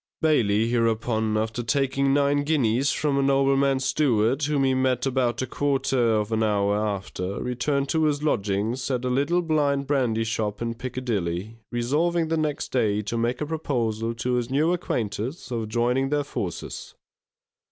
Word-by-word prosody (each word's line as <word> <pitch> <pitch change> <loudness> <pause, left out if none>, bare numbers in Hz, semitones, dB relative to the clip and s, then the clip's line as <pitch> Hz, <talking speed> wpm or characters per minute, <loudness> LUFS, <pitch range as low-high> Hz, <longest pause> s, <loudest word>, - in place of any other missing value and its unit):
Bailey, 115 -9 +2
hereupon, 110 -2 0
after 110 +2 -2
taking 135 +2 +1
nine 145 0 +2
guineas 140 -3 +2
from 145 -2 0
a - - +3
nobleman's 135 0 +2
steward, 130 -2 +2
whom 145 -2 +1
he 130 -1 +3
met 130 -1 +1
about 130 -2 0
a - - -1
quarter 130 -4 +1
of 105 0 -1
an 110 0 +1
hour 100 -2 +2
after, 100 -2 -3
returned 140 +3 -1
to 160 -1 +2
his 150 -1 0
lodgings 110 -1 -1
at 125 -2 -1
a 125 - 0
little 145 +7 +1
blind 145 -4 +1
brandy 125 -6 +1
shop 110 -2 -2
in 115 0 -2
Piccadilly, 115 -5 -3
resolving 155 +8 0
the 165 - +1
next 155 -2 -2
day 105 -4 +1
to 105 - -4
make 120 +3 -1
a - - 0
proposal 115 -8 -2
to 125 +2 -2
his 120 -1 -1
new 155 +6 +2
acquaintance 125 - -3
of 115 -3 -3
joining 125 +4 +1
their 145 0 +1
forces. 90 - -6
125 Hz, 165 wpm, -25 LUFS, 110-140 Hz, -, a